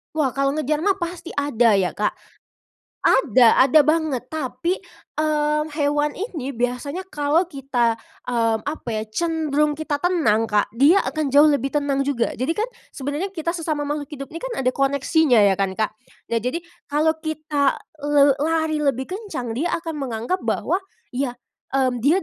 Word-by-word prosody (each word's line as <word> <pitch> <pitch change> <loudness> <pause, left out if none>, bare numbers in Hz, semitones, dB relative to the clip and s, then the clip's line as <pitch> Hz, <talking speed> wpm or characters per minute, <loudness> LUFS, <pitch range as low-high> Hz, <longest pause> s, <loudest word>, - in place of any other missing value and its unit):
Wah, 290 -5 0
kalau 275 0 +2
ngejar 305 +1 -1
mah 395 0 +2
pasti 345 0 -5
ada 245 -5 +2
ya, 190 -3 +1
Kak. 210 - +1 0.9
Ada 255 - +5
ada 310 +4 +6
banget. 310 -4 +1
Tapi, 315 +5 -2 0.4
mmm, 300 0 +1
hewan 295 0 +1
ini 315 - -5
biasanya 250 +8 -2
kalau 295 +4 +2
kita, 245 -5 0 0.2
mmm, 230 -3 0
apa 295 -3 -5
ya 215 - -1
cenderung 300 0 0
kita 305 -1 -2
tenang, 285 -11 +2
Kak, 205 -1 +1
dia 285 - +5
akan 295 +3 -2
jauh 290 +3 +6
lebih 275 -2 +1
tenang 285 -2 +1
juga. 245 -5 0
Jadi 270 +7 -2
kan 425 - 0 0.3
sebenarnya 290 +7 -3
kita 335 0 -1
sesama 315 -4 -2
makhluk 290 0 -3
hidup 275 -2 -8
ini 330 - -6
kan - - -5
ada 255 - +3
koneksinya 280 +1 +2
ya 195 -1 +3
kan, 195 -1 0
Kak, 215 +1 0 0.4
ya 230 - +2
jadi 255 +9 -3 0.2
kalau 300 +2 +2
kita 310 -3 0 0.3
le 290 -1 +5
lari 315 0 +1
lebih 275 -3 +1
kencang 370 - -5
dia 270 +10 -1 0.2
akan 325 -3 -4
menganggap 250 +6 -2
bahwa 365 - 0 0.3
ya 250 -1 -2 0.6
dia, 285 +8 +3
290 Hz, 160 wpm, -22 LUFS, 255-315 Hz, 0.9 s, ada